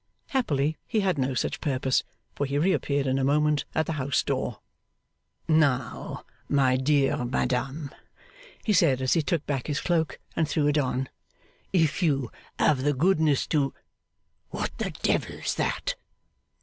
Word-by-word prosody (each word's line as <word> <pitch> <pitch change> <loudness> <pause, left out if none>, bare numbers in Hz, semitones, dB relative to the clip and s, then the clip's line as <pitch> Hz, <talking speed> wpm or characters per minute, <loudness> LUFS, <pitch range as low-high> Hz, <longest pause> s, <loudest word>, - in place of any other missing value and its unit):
Happily 155 - 0
he 220 -3 +1
had 185 -6 +1
no 130 0 0
such - - -2
purpose; 130 -3 +1 0.3
for 140 - -2
he 140 +1 -1
reappeared, 145 -4 +1
in 135 0 +1
a - - 0
moment, 150 +2 +2
at 160 - +2
the - - -3
house 130 +1 +1
door. - - -2 0.9
'Now, 140 -7 +1 0.2
my 135 -3 +3
dear 135 -1 +2
madam,' 130 +4 -1 0.7
he 215 - +2
said, 165 -9 +4
as 130 -1 +2
he 165 - +3
took 150 +2 -1
back 135 -4 -2
his 150 - -1
cloak 165 -3 0 0.2
and 160 -2 +1
threw 150 -3 +1
it 145 +1 +3
on, 130 -1 -1 0.6
'if 160 -2 +2
you 140 -8 +1 0.3
have 140 -4 +3
the 145 +2 +2
goodness 155 -2 +3
to 140 -4 +1 0.7
what - - -4
the - - -1
Devil's - - 0
that! - - -1
145 Hz, 150 wpm, -27 LUFS, 135-160 Hz, 0.9 s, said